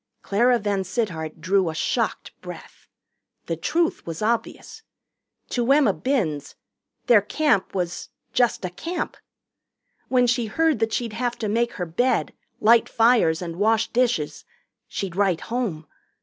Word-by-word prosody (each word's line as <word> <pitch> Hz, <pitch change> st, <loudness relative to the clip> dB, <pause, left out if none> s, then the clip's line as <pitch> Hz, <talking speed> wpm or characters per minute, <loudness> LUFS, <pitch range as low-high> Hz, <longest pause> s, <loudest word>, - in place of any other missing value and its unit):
Clara 240 Hz, +5 st, +3 dB
VanSittart 195 Hz, -5 st, -2 dB
drew 190 Hz, -1 st, +2 dB
a 160 Hz, -, -5 dB
shocked -, -, -1 dB
breath. -, -, -11 dB, 0.6 s
The 165 Hz, -, -2 dB
truth 330 Hz, -, 0 dB
was 165 Hz, +4 st, -5 dB
obvious. 235 Hz, -, -2 dB, 0.7 s
To 245 Hz, +1 st, 0 dB
Emma 285 Hz, 0 st, +5 dB
Binns 180 Hz, -, -2 dB, 0.5 s
their 230 Hz, -4 st, +6 dB
Camp 250 Hz, -2 st, 0 dB
was 180 Hz, -1 st, -3 dB, 0.2 s
just 240 Hz, -5 st, +2 dB
a 180 Hz, -, -4 dB
camp. 330 Hz, -, -4 dB, 0.9 s
When 250 Hz, -1 st, +3 dB
she 240 Hz, -1 st, +1 dB
heard 320 Hz, +2 st, +1 dB
that 225 Hz, 0 st, 0 dB
she'd 230 Hz, -2 st, -2 dB
have 240 Hz, +1 st, -2 dB
to 220 Hz, -, -3 dB
make 235 Hz, +3 st, 0 dB
her 180 Hz, -, -3 dB
bed, 245 Hz, +10 st, 0 dB, 0.3 s
light 230 Hz, +1 st, +5 dB
fires, 225 Hz, -8 st, +3 dB
and 170 Hz, -1 st, -6 dB
wash 220 Hz, +2 st, +2 dB
dishes, 235 Hz, -12 st, 0 dB, 0.4 s
she'd 190 Hz, -4 st, -4 dB
write 190 Hz, -4 st, +1 dB
home. 220 Hz, -11 st, -3 dB
220 Hz, 135 wpm, -24 LUFS, 180-245 Hz, 0.9 s, their